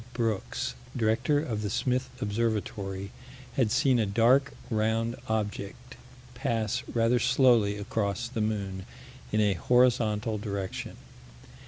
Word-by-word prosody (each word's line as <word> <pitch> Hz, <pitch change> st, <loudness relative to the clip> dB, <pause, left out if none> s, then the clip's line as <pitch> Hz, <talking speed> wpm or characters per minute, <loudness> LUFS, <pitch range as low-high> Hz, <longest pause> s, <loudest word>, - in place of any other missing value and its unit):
Brooks, 115 Hz, -, -2 dB, 0.2 s
director 120 Hz, +6 st, +2 dB
of 110 Hz, -8 st, -3 dB
the 105 Hz, -, -2 dB
Smith 130 Hz, +5 st, 0 dB
Observatory, 105 Hz, -2 st, -2 dB, 0.4 s
had 125 Hz, -5 st, +2 dB
seen 130 Hz, 0 st, +3 dB
a 110 Hz, -, +1 dB
dark 120 Hz, +7 st, +4 dB, 0.2 s
round 110 Hz, +2 st, +1 dB
object 110 Hz, +3 st, -3 dB, 0.4 s
pass 115 Hz, -1 st, -1 dB
rather 115 Hz, +1 st, +2 dB
slowly 120 Hz, -4 st, +4 dB
across 105 Hz, +1 st, -2 dB
the 115 Hz, -2 st, -3 dB
moon, 100 Hz, -3 st, -2 dB, 0.4 s
in 110 Hz, -, +2 dB
a 105 Hz, -2 st, +3 dB
horizontal 110 Hz, 0 st, +2 dB
direction. 100 Hz, -2 st, -4 dB
110 Hz, 115 wpm, -28 LUFS, 105-120 Hz, 0.4 s, dark